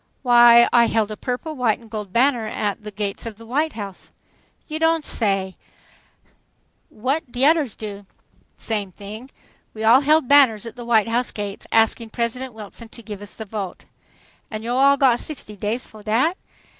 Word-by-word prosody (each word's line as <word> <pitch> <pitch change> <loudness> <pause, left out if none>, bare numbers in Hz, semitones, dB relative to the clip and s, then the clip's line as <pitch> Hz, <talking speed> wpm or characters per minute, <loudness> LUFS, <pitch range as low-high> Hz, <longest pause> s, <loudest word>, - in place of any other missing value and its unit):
"Why, 240 -1 +7
I 240 -1 +6
held 220 -2 0
a - - -4
purple, 255 +8 -4
white 245 -5 +1
and 230 - -17
gold 210 -3 -6
banner 240 0 +2
at 205 -1 -3
the 210 - -6
gates 205 +1 -4
of 225 - -7
the 230 +2 -14
White 295 +7 -1
House." 200 -4 -8 0.6
"You 310 0 -4
don' 325 -1 +2
say 195 -7 -1
so! - - -33 0.6
What 260 +4 -3
de 245 - -4
odders 295 -6 +3
do?" 205 -2 -8 0.5
"Same 210 -4 -3
thing. 215 +7 -10 0.5
We 220 - -5
all 235 +5 +6
held 300 -1 +3
banners 255 -7 +5
at 230 - -8
the 240 -1 -8
White 230 -2 +3
House 240 +2 0
gates 205 -1 -6
asking 225 0 +2
President 240 +2 -3
Wilson 220 +2 -10
to 235 - -11
give 210 -2 -8
us 205 - -10
the 220 - -7
vote." 200 -3 -6 0.6
"An' 215 0 -6
yo' 240 +2 -2
all 275 +2 +5
got 255 -3 +4
sixty 260 -8 -3
days 215 +5 -3
fo' 215 - -14
dat?" 235 - +1
230 Hz, 180 wpm, -22 LUFS, 210-255 Hz, 0.6 s, Why